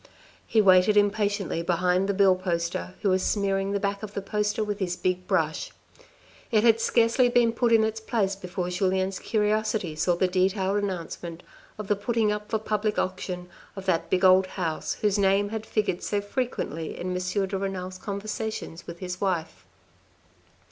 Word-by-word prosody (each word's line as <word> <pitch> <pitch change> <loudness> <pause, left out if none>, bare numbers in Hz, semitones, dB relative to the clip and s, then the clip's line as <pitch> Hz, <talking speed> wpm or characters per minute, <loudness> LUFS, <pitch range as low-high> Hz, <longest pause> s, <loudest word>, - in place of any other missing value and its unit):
He 220 - +4
waited 190 +1 +5
impatiently 205 -3 +1
behind 180 +3 +1
the 200 - +1
bill 195 -1 +5
poster 175 0 -3
who 200 - +3
was 185 0 +2
smearing 195 -1 0
the 200 - 0
back 200 0 -2
of 210 -2 -8
the 200 - -2
poster 210 +2 -1
with 205 -1 -3
his 180 -3 -1
big 185 0 -2
brush. 160 -5 0 0.8
It 215 -2 +3
had 230 -1 +5
scarcely 235 +2 +3
been 240 -2 +3
put 235 0 +1
in 225 -1 +6
its 220 0 -1
place 215 -3 0
before 180 -1 -4
Julien's 190 +1 0
curiosity 215 -5 0
saw 170 +3 +1
the 185 +2 +2
detailed 190 +2 +1
announcement 170 -2 -5 0.3
of 210 -2 -6
the 205 - +2
putting 215 +1 0
up 210 0 -4
for 220 - +1
public 215 0 -1
auction 185 -1 -3 0.3
of 195 -1 -7
that 175 -4 0
big 185 0 +2
old 185 0 +6
house 170 -4 -3
whose 210 -1 +2
name 200 +1 +3
had 220 0 -5
figured 210 -5 -1
so 205 - -1
frequently 205 - -3
in 180 +1 -3
M. 185 +2 -1
de 195 - -4
Renal's 185 -1 -4
conversations 205 -3 -5
with 170 - -7
his 180 0 -6
wife. 175 -5 -2
195 Hz, 175 wpm, -26 LUFS, 185-210 Hz, 0.8 s, in